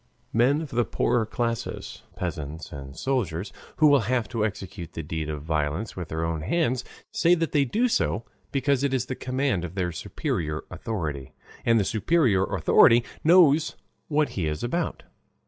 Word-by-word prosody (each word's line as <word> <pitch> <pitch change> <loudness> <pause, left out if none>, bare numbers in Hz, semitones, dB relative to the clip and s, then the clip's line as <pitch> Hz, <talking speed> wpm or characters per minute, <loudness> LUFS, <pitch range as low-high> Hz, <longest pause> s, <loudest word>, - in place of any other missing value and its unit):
Men 130 +7 +3
of 150 - -8
the 120 0 +2
poorer 115 -1 +1
class, 115 0 -3
peasants 75 +2 -5
and 70 0 -9
soldiers, 100 -8 -1 0.2
who 155 - +4
will 145 -2 +7
have 120 -4 +1
to 115 -3 -1
execute 95 -5 -5
the 80 - -5
deed 80 0 -4
of 75 -2 -4
violence 80 +6 -1
with 90 -3 -5
their 80 +1 -2
own 80 -2 -2
hands, 125 - 0 0.3
say 175 +1 +4
that 165 -2 -1
they 145 -2 +3
do 225 - +1
so 115 - 0 0.3
because 140 -1 +1
it 135 -1 +1
is 125 -2 0
the 130 - -4
command 130 -7 -1
of 90 +1 -6
their 90 -2 -1
superior 80 -1 -3
authority, 75 - -4 0.3
and 115 -1 +4
the 100 - +1
superior 110 - +2
authority 120 +1 +5 0.2
knows 160 -2 +5 0.3
what 150 -1 +2
he 85 -5 -2
is 75 0 -3
about. 165 +8 -2
115 Hz, 170 wpm, -26 LUFS, 80-140 Hz, 0.3 s, will